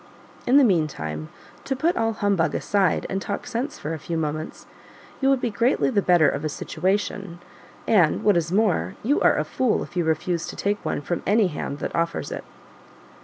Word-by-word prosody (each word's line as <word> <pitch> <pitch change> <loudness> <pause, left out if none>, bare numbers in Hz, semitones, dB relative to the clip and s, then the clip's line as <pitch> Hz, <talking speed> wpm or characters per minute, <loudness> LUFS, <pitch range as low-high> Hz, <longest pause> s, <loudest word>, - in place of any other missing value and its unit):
In 255 +3 +6
the 285 - +7
meantime, 110 - 0 0.3
to 270 - -2
put 325 +7 +1
all 225 0 +1
humbug 200 -5 +1
aside 200 -2 +1
and 195 0 -3
talk 200 - -4
sense 255 +5 -3
for 155 - -4
a 160 - -5
few 165 +3 -4
moments, 155 0 -4 0.6
you 270 - +3
would 270 -1 +3
be 235 - -1
greatly 235 +6 +2
the 205 -5 +2
better 175 -4 +4
of 145 - -1
a 155 - -1
situation, 185 +3 -2 0.5
and 180 -8 +3
what 205 -2 +4
is 170 -1 0
more, 185 - +1
you 280 +7 +2
are - - +4
a - - +1
fool 255 -4 0
if - - -12
you 175 - +1
refuse 165 +2 -1
to - - -7
take 205 +1 -1
one - - -2
from 175 +4 -3
any 205 -1 +4
hand 145 -2 -4
that - - -4
offers 165 0 -1
it." - - -5
190 Hz, 200 wpm, -24 LUFS, 160-220 Hz, 0.6 s, the